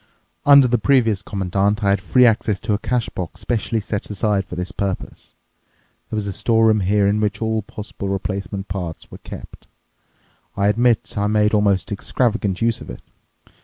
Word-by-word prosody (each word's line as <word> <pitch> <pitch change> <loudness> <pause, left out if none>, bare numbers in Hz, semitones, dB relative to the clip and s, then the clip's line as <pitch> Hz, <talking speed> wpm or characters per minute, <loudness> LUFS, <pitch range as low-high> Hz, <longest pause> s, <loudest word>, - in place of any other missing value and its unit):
Under 140 -2 +8
the 120 -1 +1
previous 115 -6 +2
Commandant, 100 +2 -1
I 100 - +3
had 100 -1 +1
free 125 +5 +4
access 110 -3 +2
to 105 - -1
a 100 - 0
cash 120 -1 -1
box 90 +2 -7
specially 110 +2 -1
set 105 0 -4
aside 105 -1 0
for - - -7
this 90 +3 -4
purpose. 100 -3 -5 0.7
There - - -4
was 105 - -2
a 100 - -3
store 115 +3 +2
room 110 -1 +4
here 100 +1 +2
in 105 +2 +2
which 100 -1 -1
all 110 -1 0
possible 100 -1 -7
replacement 100 0 -3
parts 90 -4 -6
were - - -10
kept. - - -11 0.9
I 100 +1 +3
admit 120 +2 +1
I 100 - +1
made 105 0 +2
almost 105 -1 +2
extravagant 105 -1 -1
use 115 -1 +1
of - - -10
it. - - -9
105 Hz, 180 wpm, -20 LUFS, 100-110 Hz, 0.9 s, Under